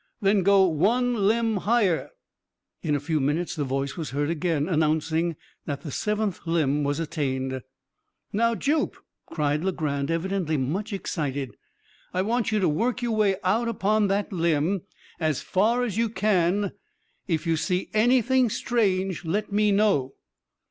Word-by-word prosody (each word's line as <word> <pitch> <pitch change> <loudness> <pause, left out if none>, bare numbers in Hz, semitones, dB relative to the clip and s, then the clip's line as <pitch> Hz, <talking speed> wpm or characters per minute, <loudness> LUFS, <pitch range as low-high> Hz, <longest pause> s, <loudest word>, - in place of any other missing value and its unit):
"Then 200 -1 +3
go 195 +1 +5
one 210 +6 +2
limb 225 0 +2
higher." 205 -4 +1 0.7
In 150 -3 0
a - - 0
few 155 +2 -1
minutes 150 +6 -1
the 150 - -1
voice 135 +1 -2
was 160 -4 -4
heard 145 +3 -1
again, 165 -2 0
announcing 160 0 +1 0.3
that 140 -1 -3
the 150 - -7
seventh 210 - -1
limb 150 -3 +1
was 145 +2 -1
attained. 130 -4 -2 0.7
"Now, 230 +2 +2
Jup," 295 +5 0 0.3
cried 150 0 -1
Legrand, 150 -7 -1
evidently 165 -1 -1
much 175 +12 -2
excited, 145 -9 -3 0.6
"I 185 - +2
want 230 +2 0
you 215 - +2
to 185 - +3
work 240 +11 0
your 235 -2 0
way 205 -3 +3
out 220 +6 +1
upon 210 -1 +1
that 200 +1 -1
limb 170 +2 +1 0.4
as 155 -4 0
far 230 +6 +2
as 220 -5 -2
you 230 -1 +2
can. 200 -2 +1 0.6
If 165 -3 -1
you 165 -1 +2
see 180 +3 -1
anything 245 +2 +3
strange 195 -6 0
let 205 +6 -2
me 210 +1 +3
know." 195 -11 +2
185 Hz, 150 wpm, -25 LUFS, 155-215 Hz, 0.7 s, go